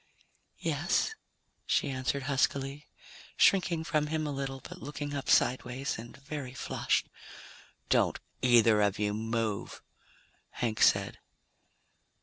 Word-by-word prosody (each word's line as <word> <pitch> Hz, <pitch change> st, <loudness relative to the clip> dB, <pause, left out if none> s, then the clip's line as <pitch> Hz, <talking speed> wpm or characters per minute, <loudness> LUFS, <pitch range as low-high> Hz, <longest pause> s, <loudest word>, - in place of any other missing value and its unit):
"Yes?" 445 Hz, -, 0 dB, 0.5 s
she 145 Hz, -, +1 dB
answered 130 Hz, +1 st, -2 dB
huskily, 140 Hz, +1 st, 0 dB, 0.5 s
shrinking 175 Hz, -4 st, +4 dB
from 150 Hz, -2 st, 0 dB
him 155 Hz, 0 st, -1 dB
a 150 Hz, -, -2 dB
little, 135 Hz, -1 st, -4 dB
but 180 Hz, +7 st, -11 dB
looking 145 Hz, 0 st, -5 dB
up 140 Hz, -1 st, -4 dB
sideways, 130 Hz, +1 st, +1 dB
and 120 Hz, +4 st, -10 dB
very 140 Hz, -2 st, -6 dB
flushed. -, -, 0 dB, 0.8 s
"Don't -, -, +2 dB, 0.2 s
either 115 Hz, -4 st, +5 dB
of 100 Hz, 0 st, +2 dB
you 105 Hz, 0 st, 0 dB
move," 110 Hz, -1 st, -3 dB, 0.7 s
Hank 115 Hz, -3 st, -2 dB
said. -, -, +3 dB
135 Hz, 115 wpm, -30 LUFS, 120-145 Hz, 0.8 s, either